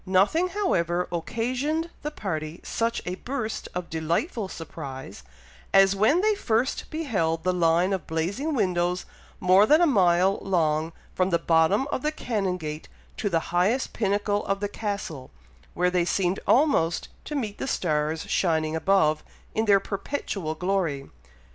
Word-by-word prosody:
Nothing, 200 Hz, -, +3 dB
however, 180 Hz, -, 0 dB
occasioned 255 Hz, -, -2 dB
the 300 Hz, -, -3 dB
party 160 Hz, -, -4 dB
such 230 Hz, 0 st, -1 dB
a 180 Hz, -, -2 dB
burst 245 Hz, -4 st, -4 dB
of 180 Hz, -1 st, -3 dB
delightful 170 Hz, -, -1 dB
surprise, 135 Hz, -, -8 dB, 0.5 s
as 195 Hz, 0 st, +6 dB
when 225 Hz, -, +3 dB
they 430 Hz, +1 st, +3 dB
first 250 Hz, -, -1 dB
beheld 195 Hz, -, -1 dB
the 185 Hz, +1 st, +1 dB
line 175 Hz, +2 st, +2 dB
of 190 Hz, -, -3 dB
blazing 200 Hz, -, -2 dB
windows 180 Hz, -4 st, 0 dB, 0.3 s
more 185 Hz, +3 st, +5 dB
than 305 Hz, +5 st, +6 dB
a 350 Hz, -, +5 dB
mile 190 Hz, -, +3 dB
long, 160 Hz, -3 st, +1 dB, 0.2 s
from 185 Hz, 0 st, +1 dB
the 170 Hz, -, +3 dB
bottom 165 Hz, +9 st, +3 dB
of -, -, -1 dB
the 305 Hz, -, 0 dB
Canongate 180 Hz, -, -3 dB, 0.3 s
to 210 Hz, -, -1 dB
the 165 Hz, -3 st, +2 dB
highest 200 Hz, +9 st, +1 dB
pinnacle 205 Hz, 0 st, 0 dB
of 195 Hz, 0 st, 0 dB
the 205 Hz, -, -1 dB
Castle, 200 Hz, -10 st, -5 dB, 0.5 s
where 180 Hz, +1 st, +2 dB
they 180 Hz, -1 st, +2 dB
seemed 180 Hz, +1 st, 0 dB
almost 250 Hz, -, +3 dB, 0.2 s
to 300 Hz, -, -5 dB
meet 215 Hz, -7 st, -3 dB
the -, -, -3 dB
stars 155 Hz, -, -1 dB
shining 160 Hz, -3 st, +1 dB
above, 160 Hz, -3 st, +2 dB, 0.3 s
in 220 Hz, -, 0 dB
their 200 Hz, -2 st, +5 dB
perpetual 195 Hz, -, -4 dB
glory. 170 Hz, -6 st, -1 dB
190 Hz, 150 wpm, -26 LUFS, 165-225 Hz, 0.5 s, as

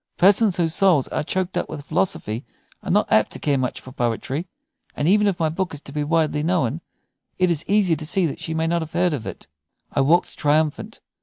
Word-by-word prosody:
Persons 200 Hz, +1 st, +5 dB
whose 165 Hz, -2 st, +1 dB
souls 180 Hz, -8 st, +3 dB
are -, -, -1 dB
choked 185 Hz, +4 st, -2 dB
up -, -, -4 dB
with 145 Hz, -, -7 dB
philosophy 115 Hz, -, -1 dB, 0.4 s
are -, -, -7 dB
not -, -, +2 dB
apt -, -, +4 dB
to -, -, -4 dB
care 140 Hz, -3 st, +1 dB
much 125 Hz, -1 st, -2 dB
for 130 Hz, -, -12 dB
poetry; 130 Hz, +6 st, -2 dB, 0.5 s
and 145 Hz, -, 0 dB
even 210 Hz, +3 st, +4 dB
if 190 Hz, -3 st, 0 dB
my 160 Hz, -, +2 dB
book 175 Hz, +1 st, -3 dB
is 145 Hz, -, -8 dB
to 140 Hz, -, -10 dB
be 150 Hz, +1 st, -2 dB
widely 155 Hz, -1 st, +1 dB
known, 160 Hz, -3 st, 0 dB, 0.6 s
it 185 Hz, -1 st, +2 dB
is 165 Hz, -1 st, -1 dB
easy 195 Hz, -4 st, +3 dB
to 155 Hz, -, -6 dB
see 190 Hz, +1 st, +1 dB
that 150 Hz, -, -3 dB
she 160 Hz, -, -4 dB
may 160 Hz, 0 st, 0 dB
not 170 Hz, +1 st, 0 dB
have 160 Hz, -1 st, -7 dB
heard 175 Hz, 0 st, +2 dB
of 125 Hz, -6 st, -4 dB
it." -, -, -8 dB, 0.5 s
I 140 Hz, -, +1 dB
walked 165 Hz, +6 st, +2 dB
triumphant. 150 Hz, 0 st, 0 dB
160 Hz, 225 wpm, -22 LUFS, 145-180 Hz, 0.6 s, Persons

